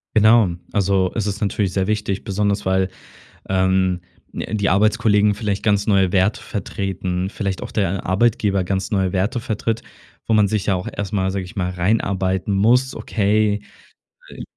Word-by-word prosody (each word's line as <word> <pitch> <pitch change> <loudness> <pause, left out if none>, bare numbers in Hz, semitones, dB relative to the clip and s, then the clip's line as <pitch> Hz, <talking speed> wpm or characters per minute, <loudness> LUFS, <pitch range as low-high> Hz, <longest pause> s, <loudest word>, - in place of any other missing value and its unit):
Genau, 110 -2 +6 0.2
also 95 -2 +2
es 110 - -1
ist 105 0 -3
natürlich 100 -2 0
sehr 95 0 -1
wichtig, 105 -2 -2
besonders 100 0 -1
weil, 95 0 +1 0.6
ähm, 95 -1 +1 0.3
ne, - - -4
die 100 -2 +1
Arbeitskollegen 105 0 +3
vielleicht 100 -3 -2
ganz 100 -2 +1
neue 95 -3 +3
Werte 95 +2 +2
vertreten, 95 -3 -3
vielleicht 100 -2 -3
auch - - -6
der 95 -2 -1
Arbeitgeber 100 -1 +2
ganz 95 +1 -2
neue 95 -4 0
Werte 100 +6 0
vertritt, 115 0 -2 0.4
wo 110 - 0
man 105 -2 +4
sich 105 -1 -1
ja 100 - +2
auch 90 - -4
erst 105 0 -5
mal, 95 -2 +1
sage 95 -1 -3
ich 90 - -13
mal, 90 -2 -1
reinarbeiten 95 0 0
muss. 125 +6 +3
Okay, 105 0 +1 0.7
äh, - - -9
100 Hz, 165 wpm, -20 LUFS, 95-105 Hz, 0.7 s, Genau